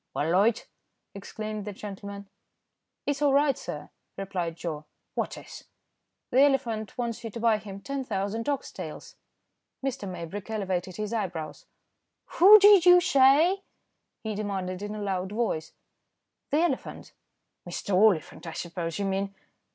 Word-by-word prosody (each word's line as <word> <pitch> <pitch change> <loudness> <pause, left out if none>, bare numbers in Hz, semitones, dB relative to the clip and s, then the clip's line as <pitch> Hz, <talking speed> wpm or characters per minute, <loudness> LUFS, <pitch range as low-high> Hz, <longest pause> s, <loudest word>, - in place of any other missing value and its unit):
"Well, 155 +3 0
Loyd," 210 +6 +3 0.5
exclaimed 215 +1 -6
that 210 - -5
gentleman. 200 0 -8 0.8
"It's 285 0 -1
all 285 -2 +4
right, 280 0 +4
sir," - - -7 0.3
replied 180 -4 -3
Joe. 155 -3 -5 0.3
"What - - -3
is?" - - -11 0.7
"The 260 - +5
elephant 235 -7 +1
wants 235 -2 -3
you 225 - -4
to 230 - -7
buy 225 -2 +3
him 200 -2 -9
10,000 230 -4 -3
ox 280 -1 -2
tails." - - -8 0.7
Mr. 265 -7 -3
Maybrick 180 +4 -7
elevated 190 -4 -2
his 215 +1 -4
eyebrows. 175 -8 -4 0.7
"Who 405 +5 +11
did 405 -3 +7
you 355 0 +8
say?" 330 +3 +4 0.6
he 220 -1 -3
demanded 195 -3 -3
in 205 +1 -5
a 210 - -5
loud 190 -1 -2
voice. 215 -8 -1 0.8
"The 295 +3 +2
elephant." 345 - -2 0.6
"Mr. 190 +3 -4
Oliphant, 185 -4 +3
I 165 - -5
suppose 170 0 -4
you 200 - -1
mean." 195 +1 -2
210 Hz, 140 wpm, -27 LUFS, 190-260 Hz, 0.8 s, Who